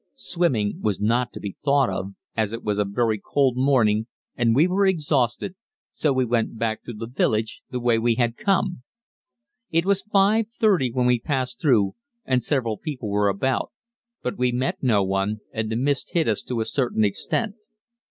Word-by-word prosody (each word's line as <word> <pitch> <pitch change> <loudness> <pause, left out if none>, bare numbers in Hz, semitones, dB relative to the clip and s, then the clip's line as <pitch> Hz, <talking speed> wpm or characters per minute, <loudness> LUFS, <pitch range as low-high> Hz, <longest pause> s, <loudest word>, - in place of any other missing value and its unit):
Swimming 130 - 0
was 105 -3 0
not 120 +4 +1
to - - -8
be 100 -2 -6
thought 140 -2 +3
of, 95 +1 -4 0.2
as 110 -1 0
it 115 - -5
was 105 -1 -1
a 105 - +2
very 110 +2 0
cold 135 -3 +2
morning 120 -5 +2 0.3
and 115 -2 +2
we 155 +6 +5
were 190 +2 +1
exhausted, 150 - 0 0.4
so 185 -11 0
we 130 -1 +2
went 115 -1 0
back 110 -1 -2
through 120 - -7
the 110 +2 -5
village 110 -2 -1
the 125 - -3
way 120 -2 +2
we 115 0 +2
had 120 -1 +1
come. 195 - 0 0.9
It 165 +1 +1
was 200 0 +2
5.30 210 - +2
when 125 -1 +2
we 125 -1 +3
passed 130 -2 -2
through 115 -10 +3 0.3
and 130 -2 +1
several 115 -7 -1
people 135 -9 -5
were 100 0 +2
about, 125 +6 0 0.5
but 125 - -3
we 125 0 +2
met 125 +2 -2
no 110 -7 +3
one, 95 +2 -1
and 110 -1 -2
the - - -1
mist 135 +3 -1
hid 165 -2 +2
us 110 -3 +1
to 120 -3 -2
a - - -1
certain 120 -5 0
extent. 200 - -1
125 Hz, 185 wpm, -24 LUFS, 110-145 Hz, 0.9 s, we